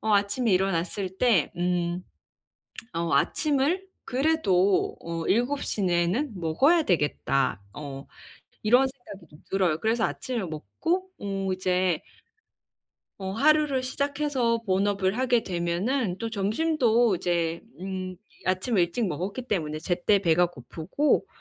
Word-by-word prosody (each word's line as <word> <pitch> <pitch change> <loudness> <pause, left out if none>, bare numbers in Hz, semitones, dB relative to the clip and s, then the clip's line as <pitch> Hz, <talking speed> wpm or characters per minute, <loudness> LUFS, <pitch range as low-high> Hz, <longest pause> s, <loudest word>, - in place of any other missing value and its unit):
어 220 -1 0
아침에 205 +4 +1
일어났을 185 +1 0
때 220 - +3
음 175 0 -1 0.9
어 170 0 -1
'아침을 305 +5 +1 0.2
그래도 225 - +2
어 165 -1 -4
7 245 +8 +1
시 210 - -2
내에는 180 - +1
먹어야 275 - +3
되겠다.' 145 - 0
어 140 -2 -7 0.6
이런 245 +5 +5
생각이 225 - -12
좀 150 - -16
들어요. 180 -5 +2
그래서 225 +1 +1
아침을 235 -8 -3
먹고 245 - -2
어 195 -1 -3
어제 185 -2 +1 1.2
...어 190 0 -3
하루를 290 +1 +3
시작해서 275 -3 0
본업을 195 +2 +1
하게 250 -3 +2
되면은 180 +5 -1
또 230 -1 -3
점심도 230 - +2
이제 170 -1 -1 0.2
음 185 -1 -5 0.3
아침 185 +4 +1
일찍 175 +6 +1
먹었기 190 - -3
때문에 155 -7 -1
제때 180 +4 +2
배가 175 -1 +4
고프고 170 - -1
195 Hz, 250 characters per minute, -26 LUFS, 175-250 Hz, 1.2 s, 이런